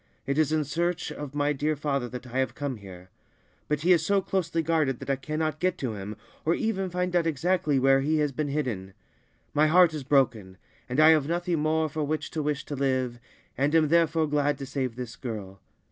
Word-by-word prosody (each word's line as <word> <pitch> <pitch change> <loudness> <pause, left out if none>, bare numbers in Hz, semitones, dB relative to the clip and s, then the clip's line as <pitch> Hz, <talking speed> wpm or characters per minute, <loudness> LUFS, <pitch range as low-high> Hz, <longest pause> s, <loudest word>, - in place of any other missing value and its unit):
It 140 +3 0
is 155 -1 +2
in 155 -1 +2
search 170 +4 -2
of 145 -1 -7
my 145 0 +1
dear 150 +2 0
father 140 -4 -2
that 125 +1 -7
I 125 +1 -3
have 130 - -1
come 140 -4 -3
here; 95 -2 -12 0.6
but 150 -1 -1
he 175 +3 +3
is 165 -2 +2
so 200 +3 +3
closely 170 -4 -1
guarded 155 -5 +1
that 140 - -4
I - - +2
cannot 155 +3 -3
get 185 0 0
to 125 -8 -3
him, 105 +1 -7 0.3
or 165 +2 +2
even 195 -4 -1
find 180 0 -2
out 170 -1 +3
exactly 165 -1 +1
where 135 +1 +4
he 155 +3 +1
has 150 -2 +1
been 150 +2 -2
hidden. 120 -10 -3 0.6
My 150 +1 +4
heart 175 +1 +5
is 150 -3 -4
broken, 120 -9 +1 0.3
and 125 +4 -1
I 155 +1 +8
have 155 -3 +4
nothing 175 0 0
more 155 +1 +1
for 155 +1 -3
which 155 +2 -2
to 155 - -2
wish 150 -1 -2
to 145 - -5
live, 130 -3 -1 0.4
and 140 +4 +1
am 155 -2 +4
therefore 165 -1 +3
glad 145 -1 +1
to 135 - -6
save 130 -3 -3
this 125 -2 -6
girl. 105 -7 -7
150 Hz, 220 wpm, -27 LUFS, 130-160 Hz, 0.6 s, I